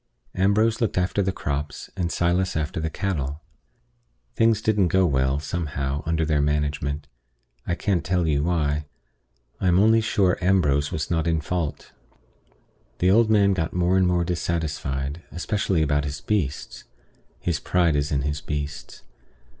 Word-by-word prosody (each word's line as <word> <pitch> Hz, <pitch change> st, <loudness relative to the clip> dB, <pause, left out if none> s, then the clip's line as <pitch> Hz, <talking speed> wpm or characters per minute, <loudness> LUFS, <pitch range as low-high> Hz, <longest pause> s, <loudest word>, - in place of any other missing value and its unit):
Ambrose 105 Hz, +5 st, +2 dB
looked 115 Hz, -, 0 dB
after 90 Hz, +3 st, +1 dB
the 95 Hz, 0 st, 0 dB
crops, 75 Hz, -3 st, -4 dB
and 90 Hz, -3 st, -2 dB
Silas 90 Hz, +2 st, +1 dB
after 75 Hz, +1 st, -2 dB
the 80 Hz, 0 st, -2 dB
cattle. 75 Hz, -6 st, -3 dB, 1.0 s
Things 115 Hz, -2 st, +3 dB
didn't 105 Hz, -4 st, +2 dB
go 95 Hz, +2 st, +3 dB
well, 65 Hz, -2 st, +1 dB
somehow, 75 Hz, -4 st, -3 dB
under 80 Hz, -1 st, +1 dB
their 75 Hz, -2 st, +1 dB
management. 75 Hz, 0 st, -1 dB, 0.6 s
I 85 Hz, -, 0 dB
can't 95 Hz, -4 st, 0 dB
tell 90 Hz, -2 st, 0 dB
you 75 Hz, -3 st, +1 dB
why. 75 Hz, -3 st, 0 dB, 0.7 s
I 95 Hz, -, 0 dB
am 90 Hz, 0 st, +4 dB
only 110 Hz, +3 st, +5 dB
sure 100 Hz, -4 st, +1 dB
Ambrose 75 Hz, -7 st, +2 dB
was 80 Hz, +1 st, -3 dB
not 80 Hz, -1 st, +1 dB
in 80 Hz, -1 st, +2 dB
fault. 80 Hz, 0 st, -3 dB, 1.1 s
The 90 Hz, +1 st, +3 dB
old 110 Hz, +2 st, +4 dB
man 100 Hz, -2 st, +4 dB
got 80 Hz, -4 st, -2 dB
more 90 Hz, +1 st, +2 dB
and 95 Hz, -1 st, +4 dB
more 90 Hz, -1 st, +2 dB
dissatisfied, 80 Hz, -4 st, -2 dB
especially 90 Hz, -2 st, 0 dB
about 75 Hz, -1 st, +1 dB
his 70 Hz, 0 st, -4 dB
beasts. 80 Hz, -7 st, -2 dB, 0.5 s
His 85 Hz, -4 st, -1 dB
pride 85 Hz, -4 st, +2 dB
is 70 Hz, 0 st, 0 dB
in 70 Hz, -2 st, 0 dB
his 75 Hz, 0 st, -2 dB
beasts. 75 Hz, -1 st, -5 dB
85 Hz, 155 wpm, -24 LUFS, 75-95 Hz, 1.1 s, only